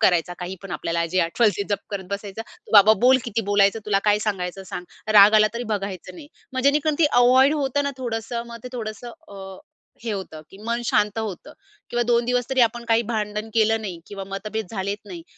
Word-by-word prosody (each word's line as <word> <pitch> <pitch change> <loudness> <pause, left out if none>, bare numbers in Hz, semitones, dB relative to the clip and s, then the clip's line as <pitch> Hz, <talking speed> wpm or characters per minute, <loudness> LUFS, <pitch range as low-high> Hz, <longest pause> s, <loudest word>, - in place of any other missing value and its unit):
करायचा, 180 -4 +2
काहीपण 185 +2 -7
आपल्याला 170 0 -1
जे 185 - +1
आठवल 180 +7 +2
ती - - -1
जप 200 - +1
करत 200 -2 -4
बसायचं. 200 +1 -5 0.3
बाबा 210 +1 +8
बोल 260 +1 +6
किती 230 -1 -1
बोलायचं 200 +1 +3
तुला, 200 -2 +2
काय 210 -1 +4
सांगायचं 195 -2 -3
सांग. 180 - -6 0.3
राग 205 0 +8
आला 215 0 +6
तरी 235 - -3
बघायचं 195 - -5
नाही. 305 -4 -12 0.2
मग 260 - -2
जेणेकरून 300 +1 +1
ते 330 - +4 0.2
अव्हॉइड 260 +4 +5
होतं 285 -1 0
ना 280 - 0
थोडंसं. 235 -1 -3
मग 235 0 -9
ते - - -5
थोडंसं 230 0 -6 0.2
अ, 195 -1 -10 0.5
हे 225 - -2
होतं 185 -6 -6
की 195 - -14
मन 235 +1 -1
शांत 210 -1 +1
होतं 220 - -5 0.4
किंवा 240 0 +1
2 235 0 +3
दिवसतरी 250 +1 0
आपण 235 0 +2
काही 225 +1 +4
भांडण 210 0 -3
केलं 225 0 +3
नाही 190 -5 -6
किंवा 195 -1 -7
मतभेद 215 +1 -4
झालेत 200 0 -4
नाही. 180 -5 -9
215 Hz, 200 wpm, -23 LUFS, 195-235 Hz, 0.5 s, बाबा